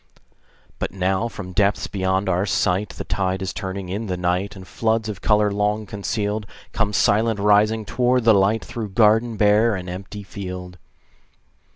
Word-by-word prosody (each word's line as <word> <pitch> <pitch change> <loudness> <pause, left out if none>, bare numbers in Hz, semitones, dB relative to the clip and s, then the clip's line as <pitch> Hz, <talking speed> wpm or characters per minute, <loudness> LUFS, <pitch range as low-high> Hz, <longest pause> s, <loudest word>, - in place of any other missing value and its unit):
But - - -2
now 95 +4 0
from 100 -5 -8
depths 100 +1 +2
beyond 95 0 -1
our 95 +2 +1
sight, 95 +2 +1
The - - -7
tide 95 -1 -1
is 95 - -3
turning 95 -1 -5
in 105 +5 -4
the 90 -1 -2
night, 90 +3 -1
And 95 -1 -11
floods 110 -1 0
of 100 -4 -6
color 105 -1 +3
long 105 +1 0
concealed 105 +1 -3 0.2
Come 105 - 0
silent 110 +1 +2
rising 105 +2 +3
toward 125 +3 +1
the 115 0 +6
light, 100 +3 +2
Through 110 -4 -6
garden 110 +2 +3
bare 105 +2 +4
and 90 -1 -6
empty 95 +3 -7
field. 90 -2 -7
100 Hz, 165 wpm, -22 LUFS, 95-110 Hz, 0.2 s, the